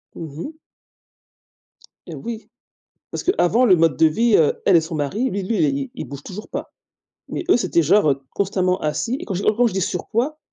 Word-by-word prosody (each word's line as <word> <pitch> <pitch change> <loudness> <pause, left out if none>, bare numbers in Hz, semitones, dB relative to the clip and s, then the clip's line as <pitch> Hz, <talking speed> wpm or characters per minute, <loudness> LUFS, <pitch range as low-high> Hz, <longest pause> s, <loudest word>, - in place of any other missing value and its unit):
Mmh 155 -2 -8
mh. 315 +1 -12 1.5
Et - - -7
oui, 230 -1 -7 0.6
parce - - -4
que 370 - +3
avant 230 +8 +3
le 190 - +6
mode 165 -5 +2
de 160 - +5
vie, 225 +8 +2
heu, 155 - +4
elle 185 - +6
et 165 - +3
son 160 0 -6
mari, 195 - -1
lui 195 0 -3
lui, 215 +2 -1
il 135 -2 -2
il - - -6
bouge 140 +2 -9
toujours 205 +3 -8
pas, - - -6 0.6
mais - - -4
eux, - - +6
c'était 180 -6 +1
genre, 155 0 +4
heu, 135 0 -1
constamment 185 -2 0
assis, 225 +11 -1
et - - -5
quand - - -5
je 195 - -2
dis - - +1
et 215 - +4
quand 245 - +4
je 230 - -1
dis 190 - -1
surpoids, 230 - -2
185 Hz, 220 wpm, -21 LUFS, 155-225 Hz, 1.5 s, le